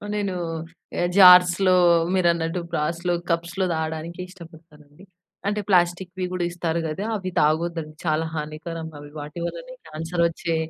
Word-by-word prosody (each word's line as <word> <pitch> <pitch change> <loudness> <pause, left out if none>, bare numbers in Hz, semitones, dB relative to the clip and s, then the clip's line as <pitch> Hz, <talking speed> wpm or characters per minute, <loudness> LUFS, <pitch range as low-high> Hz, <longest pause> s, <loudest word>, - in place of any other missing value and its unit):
నేను 200 -2 -1 0.8
జార్స్‌లో 180 0 +7 0.4
మీరన్నట్టు 170 -2 +1
బ్రాస్‌లో, 170 +3 -1 0.2
కప్స్‌లో 170 +3 -1
తాగడానికి 160 +2 -4
ఇష్టపడతానండి. 160 -2 -16 0.4
అంటే 210 0 0
ప్లాస్టిక్‌వి 180 0 +1
కూడా 180 -1 -1
ఇస్తారు 170 -1 -2
కదా! 175 +7 -4
అవి 185 -3 -4
తాగొద్దండి. 160 0 0
చాలా 155 +1 +1
హానికరం 160 +2 -5
అవి. 145 0 -11
వాటి 145 +3 -7
వల్లనే - - -7
క్యాన్సర్ 165 +2 -2
వచ్చే 165 0 -3
170 Hz, 120 wpm, -23 LUFS, 160-180 Hz, 0.8 s, జార్స్‌లో